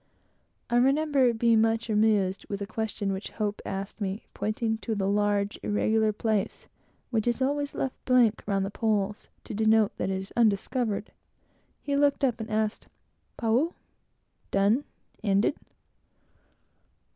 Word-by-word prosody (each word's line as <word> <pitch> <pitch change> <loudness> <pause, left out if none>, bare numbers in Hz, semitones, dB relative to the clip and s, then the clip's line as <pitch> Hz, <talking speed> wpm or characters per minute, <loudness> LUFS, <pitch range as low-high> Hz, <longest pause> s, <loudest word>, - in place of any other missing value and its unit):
I 240 - +1
remember 275 0 +3
being 230 -1 +3
much 225 +1 +1
amused 210 -3 +2
with 200 - -3
a 200 - -3
question 215 -2 -3
which 190 +2 -5
Hope 210 -1 -3
asked 195 +2 -5
me. 195 +1 -3
Pointing 220 +1 -1
to 225 -1 -3
the 195 -2 -1
large 205 0 +1
irregular 220 +1 +2
place 215 -1 -2 0.4
which 225 -1 0
is 240 +1 +1
always 285 +2 -1
left 265 - -3
blank 245 -4 +4
round 195 -1 +1
the 195 - -4
poles, 210 -1 -1
to - - -7
denote 220 0 +3
that - - -1
it 190 - 0
is 190 +1 -7
undiscovered, 220 0 +1 0.7
he 285 - -1
looked 285 0 +2
up 245 -4 +2
and 220 +1 -5
asked. 215 0 -1 0.5
"Pau?" 240 +9 +1 0.7
(Done? 205 +8 +2 0.4
ended?) 200 +4 +2
220 Hz, 140 wpm, -27 LUFS, 205-235 Hz, 0.7 s, blank